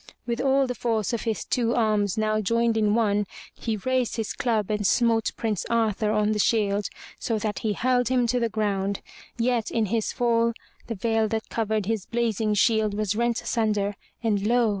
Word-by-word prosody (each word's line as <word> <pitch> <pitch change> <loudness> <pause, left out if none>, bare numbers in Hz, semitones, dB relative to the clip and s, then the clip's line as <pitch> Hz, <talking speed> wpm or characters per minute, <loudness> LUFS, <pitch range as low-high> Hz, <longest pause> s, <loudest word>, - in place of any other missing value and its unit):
With 235 0 -2
all 270 0 +3
the 250 - -2
force 225 -2 -1
of 235 - -2
his 225 -2 -2
two 235 -1 0
arms 210 -4 +1
now 215 0 +1
joined 230 +2 +1
in 215 -1 +2
one, 210 -3 +1 0.3
he 225 -2 -3
raised 255 +3 0
his 225 -2 -3
club 220 -4 0
and 210 0 -1
smote 230 0 +2
Prince 215 -5 -1
Arthur 220 -2 +1
on 210 0 +2
the 215 - -1
shield, 205 -2 +1 0.3
so 225 - -1
that 210 -1 -2
he 215 -2 -1
hurled 245 +1 +1
him 250 -1 +2
to 245 +1 +1
the 230 -1 0
ground. 200 -2 -1 0.4
Yet 235 -1 0
in 225 -2 0
his 220 +2 -1
fall 235 -1 +2 0.3
the 230 - -3
veil 225 +2 +1
that 220 0 -3
covered 220 -2 -1
his 220 -2 -2
blazing 225 -3 0
shield 215 -1 +2
was 210 -1 -1
rent 235 0 0
asunder 210 -3 0 0.3
and 210 -3 +1
lo! 240 -1 +3
220 Hz, 190 wpm, -25 LUFS, 210-235 Hz, 0.4 s, all